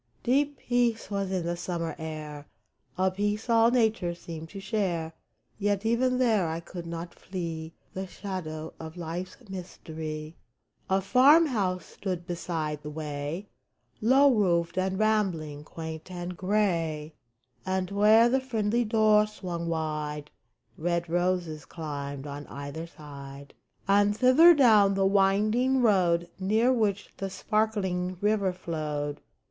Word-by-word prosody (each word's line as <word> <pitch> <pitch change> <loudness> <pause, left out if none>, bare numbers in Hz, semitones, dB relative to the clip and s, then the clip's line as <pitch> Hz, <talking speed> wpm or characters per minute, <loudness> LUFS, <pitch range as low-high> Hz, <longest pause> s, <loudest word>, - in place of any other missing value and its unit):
Deep 280 +3 +2
peace 240 -3 0
was 200 -1 -1
in 185 -3 -1
the 170 0 -1
summer 170 -2 -3
air, 150 -2 -6 0.5
A 190 0 +2
peace 205 +3 -2
all 230 0 +6
nature 220 -8 +1
seemed 165 -2 -8
to 195 - -8
share; 185 -5 -2 0.5
Yet 205 0 0
even 250 +3 +2
there 220 -8 +3
I 160 +1 -2
could 170 0 -8
not 170 +1 -6
flee 165 -3 -6 0.2
The 190 0 -4
shadow 160 -6 -6
of 160 +1 -8
life's 175 +2 -5
mystery! 160 -4 -7 0.5
A 190 +1 +2
farm 275 - +6
house 195 - -1
stood 180 -3 -5
beside 165 -4 -3
the 150 - -7
way, 150 +4 -5 0.5
Low 265 +4 +5
roofed 170 -6 +1
and 190 0 0
rambling, 185 -9 0
quaint 160 +1 -7
and 180 0 -5
gray; 170 -6 0 0.5
And 190 0 -2
where 215 +3 +6
the 265 +2 +2
friendly 235 -2 0
door 215 -1 +4
swung 175 -5 -5
wide 150 -2 -3 0.5
Red 170 +1 -1
roses 175 -3 0
climbed 140 -3 -6
on 145 0 -7
either 145 +4 -6
side. 140 -3 -11 0.3
And 205 +1 +3
thither, 300 +8 +7
down 215 -8 +5
the 195 0 +2
winding 215 +7 +3
road 175 -6 +3
Near 220 +6 +3
which 205 -4 0
the 195 - -3
sparkling 190 -4 -1
river 205 -2 +2
flowed. 150 -5 -4
185 Hz, 130 wpm, -28 LUFS, 160-215 Hz, 0.5 s, thither